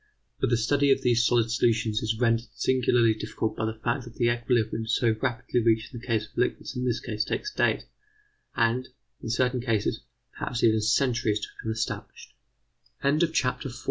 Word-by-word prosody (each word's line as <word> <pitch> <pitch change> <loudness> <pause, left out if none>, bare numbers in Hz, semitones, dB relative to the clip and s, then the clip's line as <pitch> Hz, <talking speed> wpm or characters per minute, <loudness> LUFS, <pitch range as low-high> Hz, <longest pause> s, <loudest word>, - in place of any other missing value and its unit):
But - - +1
the 120 - +3
study 140 +5 +2
of - - +2
these 120 -1 +3
solid 115 -2 +2
solutions 115 -2 +1
is 110 0 -1
rendered 115 -1 +2
singularly 120 -3 +3
difficult 110 0 -3
by 110 - -2
the 110 0 -4
fact 125 +2 0
that 120 - -12
the 120 -1 +2
equilibrium 120 -2 0
so 115 0 +2
rapidly 125 -1 0
reached 115 +3 +1
in 120 - -6
the 120 - -13
case 110 -3 +1
of 105 - -23
liquids 125 - -1
in 125 0 -2
this 120 -2 0
case 110 -3 -2
takes 420 - -3
days - - +1 0.7
and, 120 +3 +1 0.3
in 115 - -5
certain 125 +2 +1
cases, 115 -4 0 0.4
perhaps 120 -1 -3
even 110 -1 +4
centuries 110 -1 +1
to - - -4
become 110 - -3
establish 110 -2 -5
115 Hz, 175 wpm, -27 LUFS, 110-125 Hz, 0.7 s, even